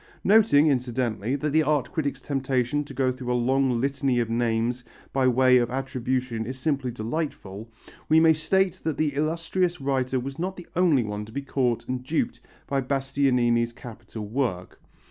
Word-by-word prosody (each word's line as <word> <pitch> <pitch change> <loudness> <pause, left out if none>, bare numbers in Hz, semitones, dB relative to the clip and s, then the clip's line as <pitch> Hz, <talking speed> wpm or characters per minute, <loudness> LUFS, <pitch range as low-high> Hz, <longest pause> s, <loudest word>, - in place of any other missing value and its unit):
Noting, 200 -8 +5
incidentally, 125 -4 0
that 145 +1 -2
the 160 +2 +4
art 150 -4 0
critic's 155 -5 -3
temptation 135 0 0
to - - -10
go 130 -1 +2
through 125 -1 -5
a - - +2
long 130 0 +1
litany 135 -1 0
of 115 -1 -1
names 120 +1 0 0.3
by 135 -1 +2
way 130 0 +5
of 120 -1 0
attribution 130 -2 -2
is 130 +1 -5
simply 135 -1 -1
delightful, 115 -3 -5 0.4
we 160 - +6
may 160 0 +6
state 190 +4 +1
that 160 -2 -2
the 155 -2 0
illustrious 165 +4 -1
writer 130 -1 0
was 135 +4 -6
not 185 +2 -2
the 180 - -10
only 165 -8 +3
one 105 -1 -4
to 110 - -13
be 140 +4 -4
caught 130 -4 -1
and 125 0 -3
duped 155 +5 -1 0.3
by 140 -1 0
Bastianini's 125 -3 +1
capital 115 -2 -9
work. 110 -6 -3
130 Hz, 170 wpm, -25 LUFS, 120-145 Hz, 0.4 s, we